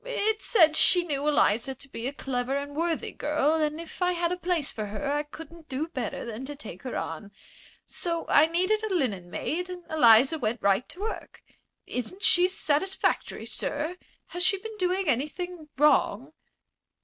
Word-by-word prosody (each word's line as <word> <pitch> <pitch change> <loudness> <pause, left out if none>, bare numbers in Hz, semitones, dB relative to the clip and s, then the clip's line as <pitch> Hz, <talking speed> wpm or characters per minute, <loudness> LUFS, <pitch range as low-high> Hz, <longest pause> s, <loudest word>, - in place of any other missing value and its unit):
"It 440 -3 -1
said 325 -9 +4
she 355 +2 +5
knew 290 -3 -2
Eliza 265 -3 +2
to 275 - -10
be 240 -2 -5
a - - -2
clever 265 -1 -2
and 285 0 -5
worthy 330 0 -1
girl, 300 0 +1
and 310 -1 0
if 335 +2 -10
I 360 0 +3
had 340 0 0
a - - +1
place 355 -5 0
for 215 -2 -4
her 275 +8 -3
I 295 +1 +1
couldn't 315 +2 -12
do 290 +5 -3
better 250 - -4
than 235 +1 -6
take 265 -10 -8
her 255 - -4
on. 165 +6 -5 0.5
So 335 -1 -2
I 300 +2 +6
needed 370 +6 +1
a 435 - -2
linen 200 - -1
maid 360 - -3
and 360 -1 -7
Eliza 265 +1 +6
went 235 -3 -2
right 200 +4 +2
to 365 - -10
work. 445 +1 -6 0.4
Isn't 250 - -5
she 360 0 +5
satisfactory, 375 +1 0
sir? 310 +5 -3 0.3
Has 355 0 -2
she 390 - +4
been 445 +3 -8
doing 370 0 0
anything 305 +5 -2
wrong?" 300 +2 +3
305 Hz, 175 wpm, -27 LUFS, 265-355 Hz, 0.5 s, I